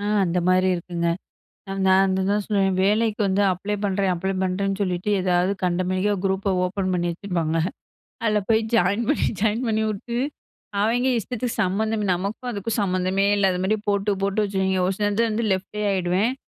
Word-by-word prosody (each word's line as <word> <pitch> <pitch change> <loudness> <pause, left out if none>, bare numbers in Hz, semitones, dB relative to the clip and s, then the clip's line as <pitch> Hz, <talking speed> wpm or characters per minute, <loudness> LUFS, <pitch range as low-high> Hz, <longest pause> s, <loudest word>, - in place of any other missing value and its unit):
ஆ, - - -4 0.2
அந்த 180 0 0
மாரி 185 +1 +4
இருக்குங்க. 170 0 -2 0.8
நான் 190 +1 +5
அதுதான் 200 +2 0
சொல்லுவேன். 195 -2 +1
வேலைக்கு 215 +2 +2
வந்து 195 +1 +1
அப்ளை 200 +3 -4
பண்றேன் 195 -1 +1
அப்ளை 190 +2 -2
பண்றேன்னு 195 +1 -1
சொல்லிட்டு, 180 0 -1
ஏதாவது 180 0 +2
கண்டமேனிக்கா 185 +3 +1
குரூப்ப 195 0 0
ஓப்பன் 185 0 -2
பண்ணி 175 -1 0
வச்சுருப்பாங்க. 170 -3 -2 0.7
அதுல 215 -2 +2
போயி 220 0 +4
ஜாயின் 205 +2 +2
பண்ணி, 295 - +2 0.2
ஜாயின் 220 +3 +1
பண்ணிவுட்டு, 220 +1 -1 0.6
அவய்ங்க 240 +4 +2
இஷ்டத்துக்கு 245 +2 -4
சம்மந்தமே 210 +3 0
நமக்கும் 200 +7 -4
அதுக்கும் 215 +1 -3
சம்மந்தமே 185 0 +1
இல்லாத 190 -2 +2
மாரி 215 +3 +1
போட்டு, 200 +1 +1
போட்டு 200 +2 +1
வச்சுருவாய்ங்க. 190 -2 0
ஒரு 195 - 0
சில 210 - 0
நேரத்துல 225 +3 +1
வந்து 225 +2 -1
லெஃப்டே 190 +3 -4
ஆயிடுவேன். 190 +5 +1
195 Hz, 155 wpm, -23 LUFS, 185-210 Hz, 0.8 s, நான்